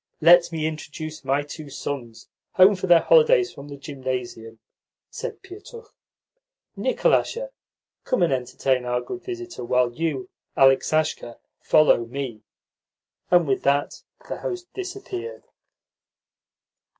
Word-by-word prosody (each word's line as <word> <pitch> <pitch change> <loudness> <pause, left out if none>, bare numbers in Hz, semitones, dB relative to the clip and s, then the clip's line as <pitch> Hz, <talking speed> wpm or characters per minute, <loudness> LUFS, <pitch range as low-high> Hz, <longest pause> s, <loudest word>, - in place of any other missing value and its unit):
"Let 170 +2 +6
me 160 -2 -2
introduce 155 0 -6
my 140 +2 0
two 145 0 -9
sons, 125 -4 -6 0.3
home 190 +2 +6
for 185 0 -4
their 175 -2 +6
holidays 475 -5 +4
from 140 - -11
the 140 -1 -9
Gymnasium 130 -5 -6 0.3
," - - -69
said 460 -4 -7
Pietukh. 415 +5 -12 0.8
"Nikolasha, - - 0 0.5
come 255 - +1
and 165 - +2
entertain 125 0 -1
our 125 0 -1
good 370 -1 -7
visitor, 360 - -7
while 125 0 +1
you, 155 -3 -3 0.3
Aleksasha, 135 -2 +2 0.2
follow 130 -6 +4
me." 125 -3 -5 0.9
And 175 -3 +4
with 135 - 0
that 140 +1 0 0.3
the - - -4
host 360 -1 -6
disappeared. 390 +4 -6
155 Hz, 120 wpm, -24 LUFS, -, 0.9 s, Let